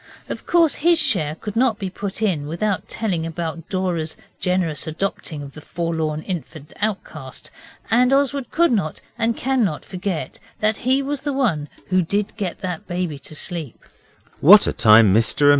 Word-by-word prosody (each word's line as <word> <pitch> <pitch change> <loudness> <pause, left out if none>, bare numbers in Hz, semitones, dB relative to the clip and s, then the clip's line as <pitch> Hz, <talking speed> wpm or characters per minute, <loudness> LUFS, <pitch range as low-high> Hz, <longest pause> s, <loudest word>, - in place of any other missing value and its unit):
Of - - -6
course 335 -3 +3
his 340 +2 +5
share 195 - +2
could 210 +4 -7
not 235 -2 +3
be 190 -2 -4
put 200 +3 -5
in 160 -9 0
without 190 +6 -2
telling 190 -7 -2
about 165 0 -5
Dora's 175 -4 -2 0.2
generous 170 -5 0
adopting 160 -2 -3
of 140 - -9
the 155 - -11
forlorn 160 -2 -2
infant 165 -4 -6
outcast, 165 -10 -4 0.4
and 250 +3 +4
Oswald 275 -2 +1
could 340 -1 +3
not 190 -9 -1 0.2
and 230 0 0
cannot 240 - 0
forget 185 -2 -4 0.2
that 215 0 +1
he 260 +3 +1
was 280 0 -3
the 290 0 -2
one 190 - 0 0.2
who 185 0 +3
did 200 +5 -1
get 195 -5 -4
that 180 -3 -4
baby 175 -5 -3
to 155 - -10
sleep. 155 -5 -5
185 Hz, 150 wpm, -21 LUFS, 160-230 Hz, 0.4 s, his